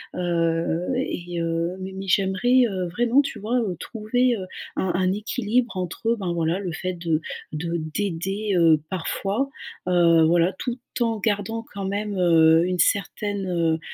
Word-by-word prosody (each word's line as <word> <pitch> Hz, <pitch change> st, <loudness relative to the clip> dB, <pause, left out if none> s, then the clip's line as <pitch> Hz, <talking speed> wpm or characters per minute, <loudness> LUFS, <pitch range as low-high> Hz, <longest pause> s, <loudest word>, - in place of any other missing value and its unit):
heu, 170 Hz, -1 st, 0 dB
et 175 Hz, -9 st, -3 dB
heu, 165 Hz, 0 st, 0 dB
mais 190 Hz, 0 st, -6 dB
mais 195 Hz, 0 st, -6 dB
j'aimerais, 205 Hz, +7 st, +3 dB
heu, 185 Hz, -2 st, -2 dB
vraiment, 240 Hz, +8 st, +3 dB
tu -, -, -5 dB
vois? 230 Hz, +5 st, -1 dB
Heu, 195 Hz, -6 st, -2 dB
trouver, 240 Hz, +2 st, 0 dB
heu, 185 Hz, -, -5 dB, 0.3 s
un 190 Hz, -, +1 dB
un 185 Hz, 0 st, +2 dB
équilibre 230 Hz, +3 st, -1 dB
entre, 185 Hz, +4 st, -4 dB
heu, 235 Hz, -, +3 dB
ben 185 Hz, -3 st, -2 dB
voilà 170 Hz, +2 st, 0 dB
le 180 Hz, -4 st, -4 dB
fait 185 Hz, +2 st, -3 dB
de 165 Hz, -2 st, -1 dB, 0.3 s
de 170 Hz, +2 st, -2 dB, 0.2 s
d'aider, 200 Hz, +2 st, -1 dB
heu, 165 Hz, -2 st, +5 dB
parfois, 195 Hz, +8 st, -1 dB, 0.4 s
heu, 170 Hz, -2 st, +5 dB
voilà, 175 Hz, +3 st, +3 dB
tout 245 Hz, -1 st, -3 dB, 0.2 s
en 225 Hz, -2 st, +1 dB
gardant 220 Hz, +2 st, -1 dB
quand 200 Hz, -1 st, -4 dB
même, 205 Hz, +1 st, -2 dB
heu, 165 Hz, -1 st, +5 dB
une 180 Hz, -1 st, -2 dB
certaine, 200 Hz, +2 st, 0 dB
heu, 165 Hz, -2 st, +1 dB
185 Hz, 165 wpm, -24 LUFS, 170-210 Hz, 0.4 s, heu